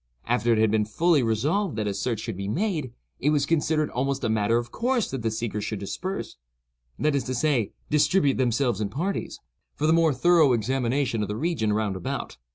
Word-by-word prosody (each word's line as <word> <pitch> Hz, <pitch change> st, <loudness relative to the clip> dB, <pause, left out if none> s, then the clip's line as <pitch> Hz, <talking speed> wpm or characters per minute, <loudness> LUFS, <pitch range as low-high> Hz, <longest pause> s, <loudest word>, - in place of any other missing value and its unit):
After 120 Hz, 0 st, +1 dB
it 115 Hz, -, +3 dB
had 110 Hz, -1 st, +3 dB
been 110 Hz, -1 st, +2 dB
fully 155 Hz, +8 st, +2 dB
resolved 145 Hz, -, 0 dB
that 110 Hz, -1 st, -2 dB
a 100 Hz, -, -1 dB
search 110 Hz, +2 st, -2 dB
should 115 Hz, -3 st, -4 dB
be 100 Hz, +1 st, -5 dB
made, 155 Hz, -, -1 dB, 0.3 s
it 145 Hz, -, +1 dB
was 145 Hz, -2 st, +2 dB
considered 155 Hz, -1 st, +1 dB
almost 135 Hz, +2 st, -1 dB
a 115 Hz, -, +1 dB
matter 110 Hz, +1 st, +2 dB
of 120 Hz, 0 st, -4 dB
course 245 Hz, -1 st, 0 dB
that 135 Hz, -2 st, -3 dB
the 115 Hz, -, 0 dB
seekers 110 Hz, -1 st, -3 dB
should 110 Hz, -, -3 dB
disperse—that -, -, -5 dB
is 140 Hz, -, 0 dB
to 130 Hz, -, -2 dB
say, 125 Hz, -5 st, +1 dB, 0.2 s
distribute 150 Hz, -1 st, +3 dB
themselves 120 Hz, -3 st, +1 dB
in 100 Hz, -, -1 dB
parties—for 150 Hz, -, -5 dB
the 160 Hz, -, +4 dB
more 165 Hz, -1 st, +4 dB
thorough 155 Hz, 0 st, +4 dB
examination 120 Hz, +1 st, 0 dB
of 105 Hz, -, -1 dB
the 105 Hz, -, -3 dB
region 150 Hz, -7 st, 0 dB
round 105 Hz, -2 st, 0 dB
about. 95 Hz, -, -5 dB
125 Hz, 195 wpm, -25 LUFS, 110-150 Hz, 0.3 s, the